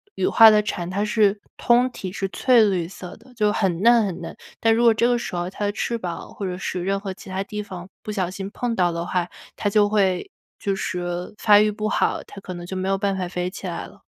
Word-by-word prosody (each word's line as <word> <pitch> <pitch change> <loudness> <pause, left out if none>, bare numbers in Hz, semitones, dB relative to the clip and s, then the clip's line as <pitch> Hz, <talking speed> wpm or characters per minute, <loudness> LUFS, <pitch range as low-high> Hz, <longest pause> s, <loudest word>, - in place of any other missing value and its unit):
羽 - - 0
化 225 - +8
的 210 0 +4
蝉， 180 -4 -3
它 200 +3 -1
是 210 -1 +2 0.2
通 245 +1 +3
体 185 -5 -6
是 195 0 -3
翠 245 +2 +4
绿 175 -4 -1
色 180 -1 -9
的， 250 +3 -19
就 210 -3 +2
很 190 -4 0
嫩 235 -1 +5
很 180 -2 -4
嫩。 - - -7 0.2
但 225 0 +3
如 235 - +2
果 230 -1 +6
这 230 +2 +2
个 245 0 +2
时 210 - -5
候 175 +1 -2
它 205 +2 -4
的 205 - +1
翅 235 +3 -2
膀， 175 -5 -6
或 200 - -4
者 180 -1 -3
是 180 -1 -3
任 195 +1 0
何 195 -1 -5
其 190 - -12
它 190 +1 -2
地 210 +1 -5
方 185 -3 -9 0.2
不 215 - -5
小 185 -4 -1
心 195 +1 -6
碰 240 +1 -2
到 175 -3 +2
的 170 +1 -3
话， 180 -1 0 0.3
它 205 - -1
就 205 0 +4
会 195 -4 +1 0.3
就 200 -1 -1
是 175 -1 -4
发 205 -1 +6
育 215 0 +3
不 215 +1 -3
好， - - +1
它 - - -11
可 185 - -7
能 175 - -7
就 190 +1 -5
没 185 +1 -2
有 195 - +2
办 195 0 -1
法 185 - -2
飞 180 0 -3
起 190 - -9
来 - - -4
了。 - - -19
195 Hz, 280 characters per minute, -23 LUFS, 180-215 Hz, 0.3 s, 化